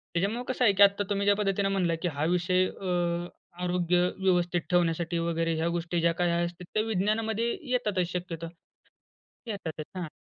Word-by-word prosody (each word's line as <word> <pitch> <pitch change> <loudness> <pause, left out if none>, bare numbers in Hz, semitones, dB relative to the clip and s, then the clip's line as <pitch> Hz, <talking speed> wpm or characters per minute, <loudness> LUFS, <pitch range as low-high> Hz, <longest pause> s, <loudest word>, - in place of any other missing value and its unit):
त्याच्यामुळे 210 +8 0
कसं 255 -1 -1
आहे 200 - +5
की 200 - +6
आता 200 0 +4
तुम्ही 200 -1 0
ज्या 205 0 +5
पद्धतीने 200 -1 0
म्हणला 180 -4 +1
की 180 - 0
हा 145 - -2
विषय 180 +2 +2
अ, 195 - -9 0.8
आरोग्य 180 0 +1 0.2
व्यवस्थित 175 -2 +2
ठेवण्यासाठी 170 -1 +1
वगैरे 165 0 0
ह्या 160 +1 0
गोष्टी 170 0 -1
ज्या 170 0 +4
काही 175 0 +1
असतील, 175 +1 -5
त्या 215 - +2
विज्ञानामध्ये 220 +2 0 0.2
येतातच 210 -8 +1
शक्यतो. 170 -2 -4 1.0
येतातच 170 -8 -5
हां, 180 -2 -3
180 Hz, 165 wpm, -28 LUFS, 170-200 Hz, 1.0 s, की